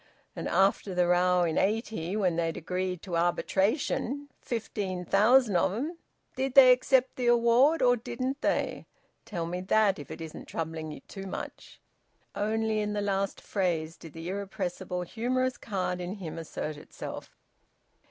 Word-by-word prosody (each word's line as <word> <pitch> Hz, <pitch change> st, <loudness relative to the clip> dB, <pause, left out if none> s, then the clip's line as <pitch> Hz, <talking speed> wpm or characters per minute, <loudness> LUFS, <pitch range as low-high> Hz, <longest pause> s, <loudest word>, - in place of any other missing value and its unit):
And -, -, -4 dB
after 195 Hz, 0 st, +2 dB
the 180 Hz, 0 st, +3 dB
row 180 Hz, 0 st, +4 dB
in 165 Hz, -2 st, +1 dB
'80, 210 Hz, -4 st, -1 dB
when 185 Hz, -5 st, +1 dB
they'd 165 Hz, -1 st, -1 dB
agreed 180 Hz, +1 st, -3 dB
to 180 Hz, -4 st, -4 dB
arbitration 220 Hz, -, 0 dB
fifteen 200 Hz, -6 st, -3 dB
thousand 215 Hz, +2 st, +4 dB
of 185 Hz, +2 st, +2 dB
'em 305 Hz, -, -4 dB, 0.4 s
did 265 Hz, 0 st, -2 dB
they 260 Hz, -2 st, +10 dB
accept 255 Hz, +1 st, +3 dB
the 250 Hz, -2 st, 0 dB
award, 240 Hz, +6 st, +5 dB
or 245 Hz, -1 st, +5 dB
didn't 255 Hz, +4 st, -4 dB
they? -, -, -1 dB, 0.4 s
Tell 175 Hz, -6 st, -3 dB
me 180 Hz, +2 st, -3 dB
that, 200 Hz, 0 st, +3 dB
if 145 Hz, -, -9 dB
it -, -, -7 dB
isn't 160 Hz, -1 st, -8 dB
troubling 160 Hz, -1 st, -4 dB
ye 150 Hz, -, -8 dB
too 195 Hz, 0 st, -9 dB
much." -, -, -7 dB, 0.5 s
Only 220 Hz, +1 st, 0 dB
in 210 Hz, 0 st, -1 dB
the 205 Hz, -, -1 dB
last 195 Hz, -1 st, -1 dB
phase 170 Hz, -5 st, -1 dB
did 165 Hz, -, -12 dB
the 165 Hz, +1 st, -7 dB
irrepressible 190 Hz, -2 st, -3 dB
humorous 255 Hz, +6 st, -1 dB
card 185 Hz, -3 st, -2 dB
in 180 Hz, +3 st, -4 dB
him 170 Hz, -5 st, -6 dB
assert 155 Hz, -1 st, -5 dB
itself. -, -, -9 dB
195 Hz, 155 wpm, -29 LUFS, 175-235 Hz, 0.5 s, they